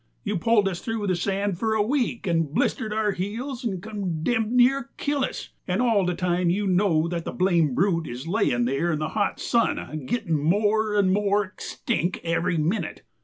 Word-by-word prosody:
You 205 -4 -1
pull 220 0 +3
us 180 -3 -3
through 225 -2 -3
the 185 -2 +1
sand 195 +1 -1
for 220 0 +1
a 210 - +3
week 245 -1 -1
and 165 -5 +1
blister 215 +7 0
our 215 -1 +1
heels 235 +8 -4
and 190 -6 -3
condemb 210 +1 -1
near 260 +1 +4
kill 285 -1 0
us, - - -4 0.2
and 185 +1 0
all 225 -7 +3
the 180 - 0
time 180 0 +1
you 200 +4 0
know 180 -4 +2
that 170 -1 -3
the - - -4
blame 170 -7 +2
brute 165 -3 +1
is 125 +4 -6
layin' 165 - +1
there 135 +7 0
in 155 - 0
the 155 +1 -2
hot 210 - -1
sun 155 - -1
gittin' 215 -11 0
more 210 +6 +2
and 195 -2 +3
more 205 0 +2
extinck 180 -1 -3
every 170 +1 0
minute. 165 +3 -1
195 Hz, 190 wpm, -25 LUFS, 170-220 Hz, 0.2 s, near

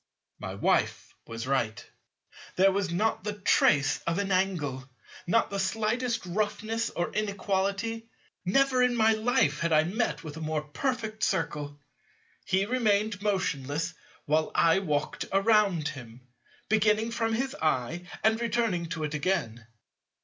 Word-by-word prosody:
My - - -6
Wife - - 0
was 115 +1 -5
right. 130 -5 -1 0.7
There 195 +1 +5
was 195 -1 -1
not 210 +3 0
the 210 0 -2
trace 145 -7 +3
of 170 +1 0
an 200 -1 -1
angle, 155 -9 -1 0.4
not 230 +5 +2
the 200 - -2
slightest 225 +4 -1
roughness 215 +4 -1
or 175 - -3
inequality: 200 +2 -1 0.4
never 260 +6 +3
in 250 -1 +3
my 225 -1 +4
life 215 -10 +1
had 170 0 0
I 155 0 +5
met 165 - -1
with 155 -1 -8
a - - -7
more 155 -1 -2
perfect 220 - -3
Circle. 145 -6 -1 0.7
He 190 +1 +1
remained 215 -4 +1
motionless 165 -6 -1 0.3
while 155 0 +1
I 165 +3 +4
walked 150 -6 -2
around 195 -6 +3
him, 125 -5 -10 0.5
beginning 215 +1 +2
from 225 -1 -1
his 265 +4 -1
eye 155 +3 -1 0.2
and 220 +1 +3
returning 225 -7 0
to 160 -1 -4
it 150 0 -3
again. 140 -8 -2
190 Hz, 140 wpm, -28 LUFS, 155-220 Hz, 0.7 s, There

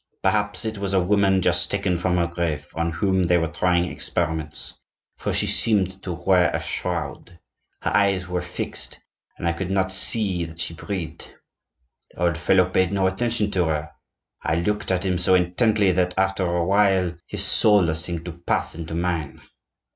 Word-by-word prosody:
Perhaps 105 -2 +1
it 110 -2 -3
was 100 -1 -2
a 95 - +4
woman 95 0 +2
just - - +3
taken 90 -2 0
from 90 +1 0
her 85 - +2
grave, 85 -3 -3
on 85 +1 -1
whom 95 +2 +1
they 90 0 +4
were 80 - +1
trying 85 +2 +1
experiments, 80 -3 -3 0.4
for - - -3
she - - +1
seemed 95 -4 +1
to 90 -4 -4
wear 90 +1 +3
a - - -2
shroud; 90 - -4 0.5
her - - 0
eyes 100 -3 +2
were 90 0 -2
fixed, 85 0 -4 0.4
and 85 - -3
I 85 - +2
could 90 +2 -4
not 95 -1 +1
see 95 -2 +3
that 80 0 -11
she 85 - -3
breathed. 85 -2 -6 0.8
The 90 - -6
old 85 -2 +1
fellow 95 +1 +4
paid 95 0 +1
no 100 -1 +1
attention 105 +2 0
to 90 -3 +1
her. 75 -1 -2 0.5
I 85 - 0
looked 105 +5 -1
at 95 0 0
him 90 -2 0
so 95 +1 +5
intently 95 +3 +2
that, 90 0 0
after 95 0 +1
a 85 0 0
while, 95 -2 +3
his - - -3
soul 100 -7 +4
seemed 85 +1 -4
to 90 - -5
pass 85 +2 -2
into 80 0 -6
mine. 85 -4 -2
90 Hz, 180 wpm, -23 LUFS, 85-95 Hz, 0.8 s, so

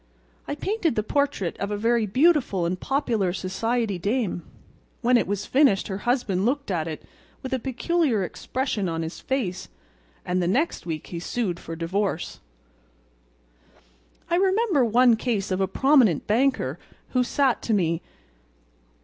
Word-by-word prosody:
I 285 - -2
painted 350 - -1
the 215 - 0
portrait 280 - 0
of 200 - -2
a 205 - -2
very 230 +1 +2
beautiful 255 - +3
and 180 +2 -2
popular 235 -9 0
society 205 +2 -1
dame. 205 -2 -1 0.6
When 250 +1 +3
it 235 - +3
was 205 +1 -2
finished 265 -9 +3
her 190 0 -3
husband 215 -7 +1
looked 275 0 0
at 165 -3 -1
it 155 -2 -6 0.4
with 260 - -4
a 260 - +1
peculiar 265 - 0
expression 215 0 -2
on 165 0 -2
his 160 - -6
face, 210 -9 -3 0.6
and 180 0 0
the 175 - 0
next 265 - 0
week 155 -2 -4
he 170 - -6
sued 180 -1 -2
for 165 - -7
divorce." 175 +2 -2 1.9
"I 345 - +1
remember 380 - +3
one 240 +1 +5
case 215 -5 -1
of 185 +1 0
a 190 - +2
prominent 250 - +3
banker 220 - +1 0.3
who 255 -1 +2
sat 265 0 +1
to 225 - -1
me. 170 -3 +1
220 Hz, 150 wpm, -25 LUFS, 185-265 Hz, 1.9 s, one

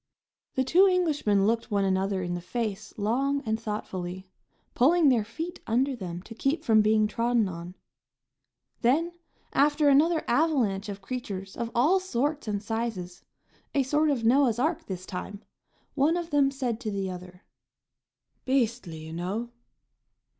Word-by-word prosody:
The 260 - +2
two 360 +9 +5
Englishmen 300 - +2
looked 230 +3 0
one 200 -2 +1
another 190 0 0
in 175 0 -3
the 175 - -3
face 210 +2 -4
long 270 +7 0
and 220 0 -1
thoughtfully, 190 -4 -5 0.5
pulling 310 +4 +4
their 240 -5 +3
feet 320 - -6
under 260 +4 +1
them 180 -5 -6
to 225 - -10
keep 275 +7 -1
from 220 -2 +5
being 215 0 +3
trodden 230 0 +1
on. 175 0 -7 1.1
Then, 310 +9 +2 0.4
after 290 +1 +4
another 310 +4 +4
avalanche 235 -8 +1
of 200 -1 -7
creatures 195 -5 -5
of 235 -1 -3
all 305 +11 +4
sorts 295 -5 -2
and 205 -1 -2
sizes, 220 -5 -4 0.5
a 275 - +4
sort 300 +4 +2
of 265 -5 0
Noah's 245 -1 +4
ark 310 +6 -1
this 185 -2 -5
time, 200 +3 -7 0.5
one 300 +5 +2
of 340 -1 -5
them 285 -2 +4
said 255 -5 -3
to 235 -4 -4
the 195 -2 -2
other: 180 +1 -10 1.0
"Beastly, 235 -10 0
you 160 - -8
know!" 200 +8 -3
230 Hz, 150 wpm, -27 LUFS, 195-280 Hz, 1.1 s, two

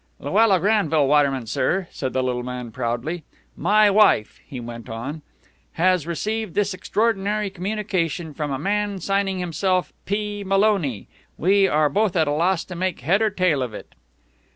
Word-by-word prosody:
"Luella 215 -4 +3
Granville 165 -7 +2
Waterman, 140 -4 +2
sir!" 170 - 0
said 130 -2 -4
the 130 +1 0
little 125 -1 -1
man 125 -1 -6
proudly. 125 +8 -3 0.3
"My 210 +5 +4
wife," 200 - +3
he 130 - -7
went 115 -1 -8
on, 135 +8 -5 0.5
"has 180 -2 +2
received 215 +3 -3
this 205 -1 +1
extraordinary 210 0 0
communication 180 -5 -2
from 150 +1 -3
a 135 - -2
man 205 +5 -1
signing 195 +1 0
himself 180 +1 -1
P. 205 0 -2
Maloney. 195 - +1 0.3
We 195 +3 +4
are 150 -2 +3
both 200 +6 0
at 160 -3 +2
a - - +1
loss 170 +4 +1
to 180 - -8
make 185 -3 -2
head 180 - +2
or 220 - +3
tail 180 -8 +1
of 120 -4 -4
it." - - -11
180 Hz, 160 wpm, -22 LUFS, 145-200 Hz, 0.5 s, My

